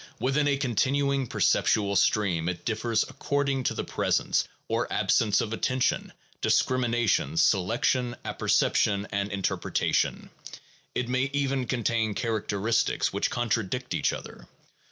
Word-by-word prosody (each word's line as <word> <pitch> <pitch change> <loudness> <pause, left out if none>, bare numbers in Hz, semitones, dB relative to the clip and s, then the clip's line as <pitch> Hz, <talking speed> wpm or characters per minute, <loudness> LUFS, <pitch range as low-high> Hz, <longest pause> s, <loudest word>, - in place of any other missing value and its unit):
Within 135 +4 +1
a 140 -1 +2
continuing 135 +1 0
perceptual 100 -2 +2
stream 90 -6 +2
it 90 -1 -6
differs 110 0 0
according 140 -1 -1
to - - 0
the - - -2
presence - - 0 0.2
or - - -1
absence 105 -3 +2
of 110 - -3
attention, 130 +2 0 0.3
discrimination, 120 +3 +1
selection, 120 - +2
apperception, 100 0 +1
and 100 0 -2
interpretation; 100 -1 -1 0.6
it 125 - -1
may 130 +2 0
even 135 -3 0
contain 115 -3 0
characteristics 110 -1 0
which - - 0
contradict 120 +1 -2
each - - +1
other. - - -9
120 Hz, 115 wpm, -27 LUFS, 105-130 Hz, 0.6 s, a